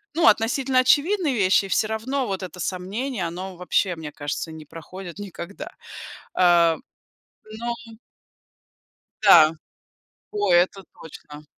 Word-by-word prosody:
ну, 335 - +3
относительно 255 +4 +3
очевидные 300 +5 +3
вещи, 195 -2 +3
и - - -6
всё 215 - +1
равно 250 +5 -2
вот 195 -1 -3
это 180 0 -8
сомнение, 195 +5 -3
оно 185 +3 -7
вообще, 180 +1 0
мне 160 -2 -8
кажется, 145 +2 -5
не 160 -1 -10
проходит 175 +4 -10
никогда. 200 - -8 0.7
Э, 170 -2 +4 0.8
но 235 0 -2 1.5
Да, 170 -7 +7 0.8
о, 205 -3 0
это 180 +3 +3 0.2
точно. 150 -1 -12
190 Hz, 120 wpm, -23 LUFS, 170-235 Hz, 1.5 s, Да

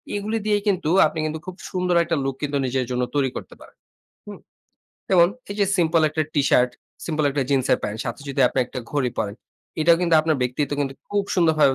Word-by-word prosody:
এগুলি 215 +2 -2
দিয়েই 205 -1 +1
কিন্তু 185 -6 +1 0.2
আপনি 155 +1 -2
কিন্তু 155 0 -3
খুব 185 -1 -7 0.2
সুন্দর 180 -2 0
একটা 165 0 -1
লুক 135 -1 -2
কিন্তু 145 -1 -1
নিজের 130 0 -1
জন্য 125 0 0
তৈরি 135 -2 +2
করতে - - -9
পারেন। - - -16 0.5
হুম? - - -9 0.7
যেমন 175 -2 +5 0.2
এই 200 - -4
যে - - +5
সিম্পল 165 -1 +3
একটা 155 +1 -1
টিশার্ট, 125 -3 +3 0.4
সিম্পল 155 -2 -1
একটা 140 0 0
জিন্সের 130 -2 +2
প্যান্ট 105 +1 -4
সাথে 120 +2 -5
যদি 135 0 -2
আপনি - - -3
একটা 130 - -7
ঘড়ি 135 -4 0
পরেন। 100 -1 -2 0.5
এটাও 165 +1 +5
কিন্তু 170 -2 +2
আপনার 155 -1 0
ব্যক্তিত্ব 130 +3 -1
কিন্তু 135 -1 -2
খুব 205 0 0
সুন্দরভাবে 155 -5 +4
155 Hz, 200 wpm, -23 LUFS, 135-170 Hz, 0.7 s, যেমন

